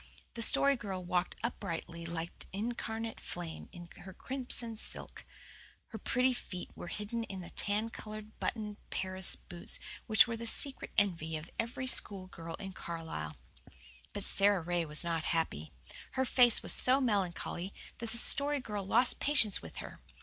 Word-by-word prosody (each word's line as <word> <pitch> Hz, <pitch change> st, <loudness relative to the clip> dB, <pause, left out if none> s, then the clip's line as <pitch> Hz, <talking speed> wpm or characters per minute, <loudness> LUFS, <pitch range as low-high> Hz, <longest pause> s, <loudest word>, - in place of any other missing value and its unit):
The 230 Hz, -, -5 dB
Story 280 Hz, +4 st, +3 dB
Girl 195 Hz, -5 st, -5 dB
walked 180 Hz, 0 st, 0 dB
uprightly 170 Hz, -6 st, -4 dB
like 170 Hz, 0 st, -4 dB, 0.2 s
an 215 Hz, +4 st, -2 dB
incarnate 225 Hz, -1 st, -5 dB
flame 170 Hz, -2 st, -6 dB
in 175 Hz, -1 st, -10 dB
her 190 Hz, 0 st, -11 dB
crimson 245 Hz, -3 st, 0 dB
silk. 215 Hz, -, -7 dB, 0.6 s
Her 220 Hz, -, -7 dB
pretty 255 Hz, +1 st, +1 dB
feet 185 Hz, -7 st, -7 dB
were -, -, -8 dB
hidden 210 Hz, +5 st, -4 dB
in 190 Hz, -3 st, -7 dB
the 175 Hz, -, -10 dB
tan 210 Hz, +2 st, 0 dB
coloured, 215 Hz, 0 st, -9 dB
buttoned 210 Hz, -2 st, -3 dB
Paris 185 Hz, 0 st, +2 dB
boots 175 Hz, -1 st, -8 dB, 0.3 s
which 220 Hz, -1 st, +7 dB
were 230 Hz, -, -3 dB
the 230 Hz, 0 st, -5 dB
secret 270 Hz, +4 st, 0 dB
envy 165 Hz, -6 st, +1 dB
of 155 Hz, +2 st, -10 dB
every 235 Hz, +3 st, -2 dB
school 200 Hz, -6 st, +5 dB
girl 165 Hz, -2 st, -8 dB
in 195 Hz, -1 st, -8 dB
Carlisle. 160 Hz, -, -6 dB, 0.7 s
But 205 Hz, -, -5 dB
Sara 200 Hz, -1 st, +2 dB
Ray 175 Hz, 0 st, -1 dB
was 150 Hz, 0 st, +1 dB
not 165 Hz, -2 st, -2 dB
happy. 80 Hz, -, -3 dB, 0.4 s
Her 260 Hz, 0 st, 0 dB
face 245 Hz, -2 st, +5 dB
was -, -, +6 dB
so 260 Hz, +2 st, +9 dB
melancholy 195 Hz, -5 st, -1 dB, 0.3 s
that 230 Hz, -1 st, -4 dB
the 235 Hz, -, +4 dB
Story 285 Hz, +4 st, +6 dB
Girl 210 Hz, -5 st, -5 dB
lost 240 Hz, +6 st, +2 dB
patience 260 Hz, -9 st, +2 dB
with -, -, -11 dB
her. -, -, -12 dB
205 Hz, 165 wpm, -32 LUFS, 175-235 Hz, 0.7 s, so